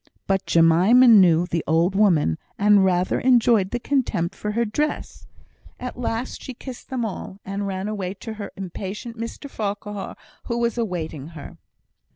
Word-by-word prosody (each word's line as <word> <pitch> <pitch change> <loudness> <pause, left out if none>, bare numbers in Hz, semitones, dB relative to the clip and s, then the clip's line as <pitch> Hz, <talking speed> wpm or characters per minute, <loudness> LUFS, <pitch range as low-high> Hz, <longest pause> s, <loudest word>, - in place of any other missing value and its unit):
But 195 -1 0
Jemima 175 +10 +5
knew 180 -7 +6
the 170 -2 -2
old 165 +4 +2
woman, 175 - +3 0.2
and 205 -1 +5
rather 180 -1 +1
enjoyed 235 -6 +4
the 240 - -2
contempt 230 -10 -1
for 210 +1 -4
her 235 +2 +1
dress. 295 +8 -3 0.5
At 250 - -6
last 240 0 -3
she 260 - -8
kissed 255 0 -10
them 255 -3 -2
all, 195 -1 -6
and 200 +1 -3
ran 190 0 -3
away 200 -3 -4
to 220 +3 -7
her 205 - -6
impatient 195 +4 -6
Mr 230 +5 -6
Farquhar, 205 -4 -5 0.3
who 235 - -2
was 235 -1 0
awaiting 170 - -4
her. 140 - -10
205 Hz, 160 wpm, -23 LUFS, 180-235 Hz, 0.5 s, knew